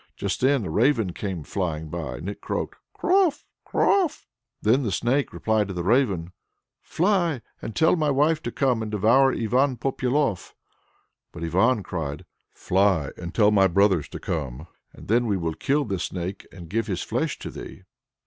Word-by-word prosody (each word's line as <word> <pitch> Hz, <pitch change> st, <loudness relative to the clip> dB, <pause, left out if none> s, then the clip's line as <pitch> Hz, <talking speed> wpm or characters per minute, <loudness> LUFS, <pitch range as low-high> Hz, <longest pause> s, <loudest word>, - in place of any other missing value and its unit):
Just -, -, -2 dB
then 130 Hz, -4 st, +3 dB
a -, -, -4 dB
raven 115 Hz, -, +2 dB
came 95 Hz, -6 st, -4 dB
flying 80 Hz, -3 st, -3 dB
by, 75 Hz, -6 st, -5 dB
and 85 Hz, -, -7 dB
it 100 Hz, -, -6 dB
croaked: -, -, -4 dB, 0.2 s
"Krof? 360 Hz, -6 st, +2 dB, 0.2 s
Krof!" 370 Hz, -6 st, +1 dB, 0.3 s
Then 115 Hz, +6 st, +3 dB
the 115 Hz, -7 st, -2 dB
Snake 120 Hz, +8 st, +1 dB
cried 110 Hz, -2 st, 0 dB
to 95 Hz, -, -6 dB
the 85 Hz, -, -2 dB
Raven, 100 Hz, -6 st, +1 dB, 0.5 s
"Fly, 175 Hz, -, +1 dB, 0.2 s
and 110 Hz, -, -6 dB
tell 160 Hz, +2 st, +4 dB
my 155 Hz, -3 st, +1 dB
wife 150 Hz, +3 st, +2 dB
to 120 Hz, -, -4 dB
come 125 Hz, -4 st, +1 dB
and 110 Hz, -, -3 dB
devour 115 Hz, +6 st, +4 dB
Ivan 125 Hz, +4 st, +1 dB
Popyalof." 130 Hz, -4 st, -1 dB, 0.8 s
But 85 Hz, -, -8 dB
Ivan 100 Hz, +7 st, +2 dB
cried: 75 Hz, -6 st, -5 dB, 0.3 s
"Fly, 95 Hz, -6 st, +1 dB
and 85 Hz, -1 st, -7 dB
tell 105 Hz, -2 st, +5 dB
my 95 Hz, -2 st, +5 dB
brothers 95 Hz, -4 st, +2 dB
to -, -, -7 dB
come, 75 Hz, -3 st, -4 dB, 0.3 s
and -, -, -14 dB
then 120 Hz, +3 st, +2 dB
we 100 Hz, -3 st, +1 dB
will 80 Hz, -2 st, -2 dB
kill 140 Hz, -, 0 dB
this 95 Hz, -5 st, -2 dB
Snake, 90 Hz, +2 st, -5 dB
and 85 Hz, -3 st, -11 dB
give 115 Hz, +6 st, -1 dB
his 95 Hz, -4 st, -2 dB
flesh -, -, -2 dB
to -, -, -7 dB
thee." -, -, -10 dB
105 Hz, 175 wpm, -25 LUFS, 90-135 Hz, 0.8 s, tell